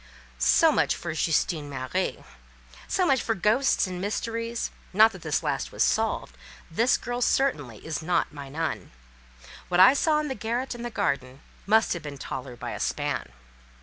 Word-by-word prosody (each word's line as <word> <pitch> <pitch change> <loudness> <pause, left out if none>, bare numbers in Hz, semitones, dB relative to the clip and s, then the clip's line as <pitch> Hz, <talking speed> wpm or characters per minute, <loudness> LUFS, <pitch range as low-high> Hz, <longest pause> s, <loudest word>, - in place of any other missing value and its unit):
"So 325 -1 +5
much - - +2
for 170 -2 -5
Justine 160 -1 0
Marie;" 135 +7 -3 0.6
so 370 - +1
much 270 -6 +3
for 225 - -1
ghosts 220 +8 +2
and 180 -1 -5
mystery: 230 +3 -3 0.4
not 220 +3 +7
that 190 - -11
this 155 -3 -1
last - - -2
was - - +1
solved—this 65 - -1
girl 245 0 -4
certainly 145 - 0
is 155 -2 -3
not 170 -1 0
my 140 -2 -8
nun: 160 +3 -3 0.8
what 180 0 +1
I 190 +7 +9
saw 300 +1 +2
in 305 - -2
the 265 - -2
garret 245 +2 -3
and 240 0 -6
garden 140 - -2 0.3
must 220 +2 +4
have 170 - -5
been 145 -2 -7
taller 130 -2 -6
by - - -6
a - - -5
span. - - -2
185 Hz, 165 wpm, -26 LUFS, 145-235 Hz, 0.8 s, I